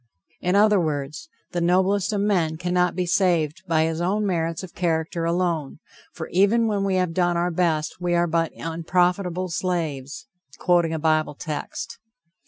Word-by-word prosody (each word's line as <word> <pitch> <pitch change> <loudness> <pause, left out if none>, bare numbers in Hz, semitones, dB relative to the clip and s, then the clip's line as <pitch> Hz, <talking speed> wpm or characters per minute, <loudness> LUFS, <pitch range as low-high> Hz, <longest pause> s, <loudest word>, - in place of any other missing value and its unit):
In 180 +2 0
other 210 0 +5
words, 150 - -3 0.2
the 175 - -2
noblest 185 +3 +2
of 205 -2 0
men 175 -6 +1
cannot 180 +1 +1
be 180 0 0
saved 175 -2 +1
by 160 -2 +3
his 160 +1 -1
own 205 +4 0
merits 165 -2 -1
of 185 - -9
character 165 -1 -1
alone, 170 -4 -1 0.3
for 160 - -7
even 205 +6 +3
when 205 -3 0
we 195 -1 +1
have 180 -2 0
done 175 0 +1
our 175 +1 0
best, 165 -1 -1
we 175 -1 +1
are 170 0 +3
but 165 0 0
"unprofitable 180 +2 0
slaves," 160 -6 -3 0.3
quoting 175 -2 +2
a 160 - -1
Bible 155 -1 +1
text. 150 0 -6
175 Hz, 165 wpm, -24 LUFS, 160-185 Hz, 0.3 s, other